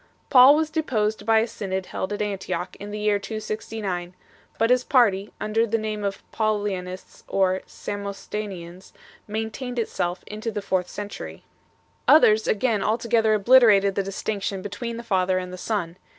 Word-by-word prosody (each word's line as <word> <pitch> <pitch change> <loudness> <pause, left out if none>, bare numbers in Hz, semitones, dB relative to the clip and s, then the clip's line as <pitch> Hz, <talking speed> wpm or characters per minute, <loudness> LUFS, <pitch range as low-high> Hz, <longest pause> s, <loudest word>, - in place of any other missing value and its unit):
Paul 260 +2 +9
was 310 0 0
deposed 220 -9 -1
by 225 -1 +5
a 225 - -1
synod 190 -4 -4
held 190 - -4
at 205 0 -1
Antioch 195 -2 -3
3 - - -11
in 205 - -7
the 210 - -5
year 210 -1 +1
269, 210 -4 -4 0.4
but 225 +2 +2
his 250 0 +4
jmrty, 205 -6 +3
under 225 +2 +1
the 225 +1 +1
name 215 -1 -3
of 200 -1 -3
Paulianists 205 -4 -3
or 190 -1 +1
Samosatenians, 200 -3 -6 0.3
maintained 225 +4 -4
itself 180 -5 -2
into 215 +2 -5
the 205 -2 -4
fourth 185 -2 -1
century. 205 0 -7 0.6
Others 220 -8 +6
again 215 -1 +1
altogether 225 0 +2
obliterated 210 -3 +5
the 200 - 0
distinction 195 0 -3
between 230 +3 -5
the 235 - -7
Father 185 -4 +1
and 180 0 -4
the - - -4
Son. 180 -6 -3
210 Hz, 155 wpm, -24 LUFS, 195-225 Hz, 0.6 s, Paul